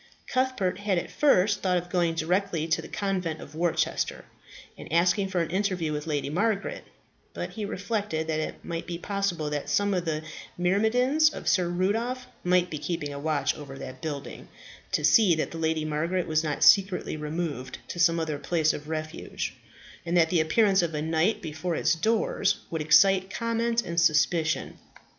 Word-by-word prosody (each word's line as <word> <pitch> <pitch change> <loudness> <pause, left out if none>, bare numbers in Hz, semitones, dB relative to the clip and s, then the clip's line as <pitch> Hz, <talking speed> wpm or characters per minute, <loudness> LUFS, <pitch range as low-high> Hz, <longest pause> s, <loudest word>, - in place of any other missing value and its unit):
Cuthbert 255 -8 0
had 205 -3 0
at 170 - -3
first 205 -8 +3
thought 180 -2 +2
of 175 0 -5
going 170 -3 +1
direct 180 +5 0 0.2
to 165 - +2
the 160 - -10
convent 185 -6 -2
of 145 - -11
Worcester, 170 +1 -1 0.5
and - - -11
asking 175 +4 +3
for 185 -2 0
an 165 - -3
interview 185 -5 0
with 150 +1 -4
Lady 145 -3 -1
Margaret; 200 +4 -1 0.5
but - - -4
he 215 -2 -4
reflected 200 -5 -2
that 160 -1 -1
it 155 - -5
might 170 0 -4
be 175 -1 -4
possible 175 -5 -2
that 145 0 -3
some 205 +7 +2
of 180 -2 -1
the 155 -1 -2 0.3
myrmidons 240 - +3
of - - -8
Sir 185 -3 +3
Rudolph 225 +8 -1 0.2
might 180 0 +2
be 155 - -4
keeping 150 -2 -3
a 140 - -6
watch 155 -1 0
over 140 -2 -9
that 130 -1 -8
building, 145 -3 -6 0.4
to - - 0
see 205 -8 +5
that 155 - -2
Lady 160 -1 -1
Margaret 165 +4 -1
was 155 -1 +1
not 150 -2 -1
secretly 190 -4 +4
removed 150 -3 -4
to 175 - -6
some 170 -1 +4
other 155 -3 -2
place 160 -1 +1
of 150 +1 -8
refuge, 155 0 -4 0.5
and 175 +1 0
that 160 -2 +4
the 170 -3 +3
appearance 195 +4 +3
of 165 -2 -2
a 150 - -1
knight 160 +6 +1
before 160 +2 -3
its - - +2
doors 205 +2 +1 0.2
would 160 -2 -2
excite 190 +4 +5
comment 230 +2 0
and 170 0 0
suspicion. 155 0 +1
175 Hz, 180 wpm, -27 LUFS, 155-195 Hz, 0.5 s, see